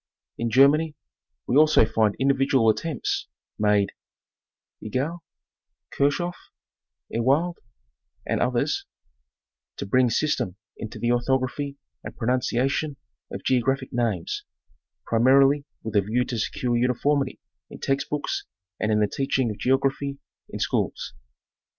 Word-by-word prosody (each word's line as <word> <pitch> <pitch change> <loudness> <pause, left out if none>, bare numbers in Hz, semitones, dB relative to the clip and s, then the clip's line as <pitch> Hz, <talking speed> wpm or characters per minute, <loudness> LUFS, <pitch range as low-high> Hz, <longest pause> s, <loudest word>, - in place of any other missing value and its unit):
In 115 - 0
Germany, 145 +5 +4 0.5
we 125 - 0
also 155 -6 +6
find 110 -2 +1
individual 135 -3 +3
attempts 150 +4 -3 0.3
made 105 -1 +3 0.9
(Egli, 135 +10 -2 0.7
Kirchhoff, 175 +5 0 0.7
Ewald 140 +10 +1 0.7
and - - -1
others) - - 0 0.9
to - - -4
bring 125 +4 +3
system 125 - 0 0.2
into 110 0 -7
the 120 - -1
orthog 120 +2 +2
raphy 140 +2 -4 0.3
and - - -8
pronunciation 130 +4 0 0.3
of - - -6
geographic 130 +1 +1
names, 115 -8 -1 0.6
primarily 135 +5 +4 0.2
with 110 -1 -5
a 100 - +6
view 115 +5 0
to 120 -3 -3
secure 120 +2 -1
uniformity 125 +4 +1 0.3
in - - -10
text 135 0 -1
books 150 -1 -2 0.3
and 110 +1 0
in 105 0 +3
the 105 - +3
teaching 135 -1 0
of 105 - -8
geography 135 +2 +1 0.3
in - - -6
schools. - - -1
130 Hz, 120 wpm, -25 LUFS, 115-140 Hz, 0.9 s, also